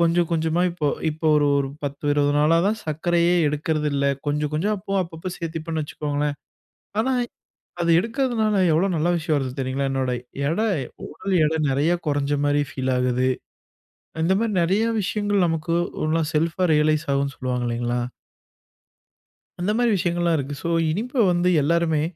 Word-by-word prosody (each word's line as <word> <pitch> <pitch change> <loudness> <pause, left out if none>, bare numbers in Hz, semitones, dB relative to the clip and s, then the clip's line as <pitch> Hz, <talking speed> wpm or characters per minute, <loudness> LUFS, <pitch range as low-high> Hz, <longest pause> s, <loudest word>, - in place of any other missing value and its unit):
கொஞ்சம் 170 0 +3
கொஞ்சமா 160 +1 +1
இப்போ 170 -3 -3 0.2
இப்போ 160 +1 -3
ஒரு 145 -1 +3
ஒரு 140 -1 0 0.2
10 140 +1 -5
20 145 0 +2
நாளாதான் 165 +8 +3
சர்க்கரையே 170 +3 +1
எடுக்குறது 150 +1 0
இல்ல. 140 0 0 0.2
கொஞ்சம் 150 0 0
கொஞ்சம் 200 +8 0
அப்போ 195 0 -7
அப்பப்போ 165 +1 -7
சேர்த்திப்பேன்னு 160 -1 -4
வச்சுக்கோங்களேன். 145 -1 -2 0.6
ஆனா, 260 +4 +1 0.7
அது 170 - +2
எடுக்கிறதுனால 230 -1 0 0.2
எவ்ளோ 170 +5 +3
நல்ல 160 +2 +1
விஷயம் 155 -1 0
வருது 135 -2 -2
தெரியுங்களா? 135 +1 -1
என்னோட 130 -2 0 0.4
எடை, 215 +7 +1 0.4
உடல் 195 -1 -3
எடை, 160 +1 0
நிறைய 145 +5 +2 0.2
குறைஞ்ச 145 0 0
மாரி 145 0 +2
ஃபீல் 130 -2 -1
ஆகுது. 125 0 +1 1.0
இந்த 190 - +3
மாரி 225 -2 0
நிறைய 195 +6 +2 0.2
விஷயங்கள் 205 -1 +1
நமக்கு 165 +1 -1 0.3
ஓனா 160 +1 +1
செல்ப்‌ஆ 165 +4 +1
ரியலைஸ் 155 +1 +2
ஆகும்னு 140 0 0
சொல்லுவாங்க 125 -2 -2
இல்லைங்களா? 120 +1 -1 1.6
அந்த 200 +4 +1
மாரி 240 -1 +3
விஷயங்கங்கள்லாம் 175 -2 +1
இருக்கு. 140 +1 -4
சோ - - -2 0.2
இனிப்ப 230 - 0
வந்து 175 +1 +2
எல்லோருமே 160 0 +2
160 Hz, 145 wpm, -23 LUFS, 145-175 Hz, 1.6 s, கொஞ்சம்